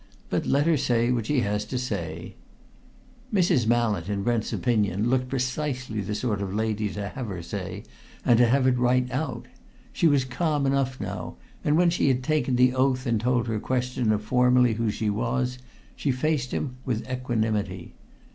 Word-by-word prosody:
But - - 0
let 140 +2 +3
her 165 -2 +3
say 120 -1 +1
what 115 -3 -1
she 145 -4 +2
has 105 0 -1
to 125 +4 -4
say." 85 -10 -4 1.0
Mrs. 170 - +2
Mallett, 110 -6 +1
in 100 -1 -1
Brent's 115 0 0
opinion, 110 -2 +1
looked 130 -1 +1
precisely 130 -3 -2
the 105 +2 -3
sort 105 -2 -1
of 100 0 -3
lady 110 -1 0
to 100 +2 -4
have 130 -4 -6
her 90 -4 -5
say, 85 - -5 0.4
and 120 -1 +5
to 120 - +6
have 130 +2 +3
it 125 -1 +3
right 125 +1 +3
out. 130 -3 -3 0.5
She 170 - +3
was 140 -4 +3
calm 145 +2 0
enough 135 -1 0
now, - - -5 0.3
and 150 +1 +2
when 175 0 +4
she 170 - +1
had 130 -1 +2
taken 150 -3 +1
the 125 0 +4
oath 130 0 +1
and 115 -4 +1
told 125 0 +1
her 110 -1 -1
questioner 125 -2 0
formally 125 +2 +3
who 115 0 -1
she 105 0 -1
was, 125 +3 -1 0.4
she 145 - -2
faced 130 -1 -1
him 125 -3 -3
with 120 -3 -2
equanimity. 110 -7 -2
125 Hz, 180 wpm, -26 LUFS, 110-130 Hz, 1.0 s, to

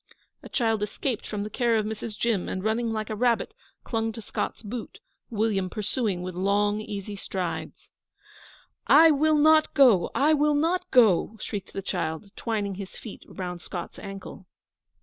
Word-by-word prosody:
A - - -11
child 225 -4 +1
escaped 225 +4 -3
from 205 -1 -3
the 210 - -5
care 235 -2 +2
of 215 -1 +1
Mrs. 220 0 -5
Jim, 225 -6 0
and, 185 - -3
running 225 +2 0
like 215 0 -3
a - - -2
rabbit, 235 +1 +1 0.3
clung 225 -1 -1
to 225 - -8
Scott's 220 - -4
boot, 225 +3 -6 0.3
William 210 -5 0
pursuing 210 -2 -2
with 185 0 -5
long, 205 +3 +1
easy 205 -1 -6
strides. 185 -3 -5 1.0
'I 320 +2 +8
will 310 +1 +3
not 310 +1 +5
go 245 - +6
I 300 +3 +4
will 300 0 +3
not 330 +5 0
go!' 220 -3 +4
shrieked 200 -3 -6
the 195 - -4
child, 160 +2 -3
twining 210 -4 -2
his 190 0 -8
feet 220 - -9
round 180 -2 -6
Scott's 175 -1 -6
ankle. 195 -2 -9
215 Hz, 165 wpm, -26 LUFS, 195-240 Hz, 1.0 s, I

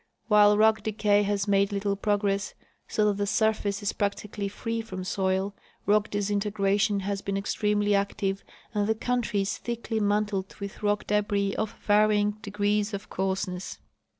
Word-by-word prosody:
While 210 -1 +6
rock 220 0 +4
decay 210 -1 +2
has 205 0 0
made 200 0 +3
little 200 0 0
progress, 200 0 0 0.3
so 215 - +1
that 205 -1 +2
the 205 0 -1
surface 215 -1 +1
is 205 - 0
practically 205 0 -2
free 230 +3 -3
from 185 -5 -6
soil, 190 +1 0 0.3
rock 210 +1 +3
disintegration 205 0 +1
has 200 0 -2
been 195 0 -2
extremely 205 +1 +1
active 200 -1 -1 0.3
and 205 -1 +1
the 220 - +3
country 235 -2 0
is 195 +3 -2
thickly 235 -1 -3
mantled 205 -2 0
with 200 -1 -7
rock 205 0 0
debris 205 -1 +1
of 220 +1 -2
varjdng 210 0 +3
degrees 205 +1 0
of 200 - -9
coarseness. 190 -1 -2
205 Hz, 150 wpm, -27 LUFS, 200-210 Hz, 0.3 s, While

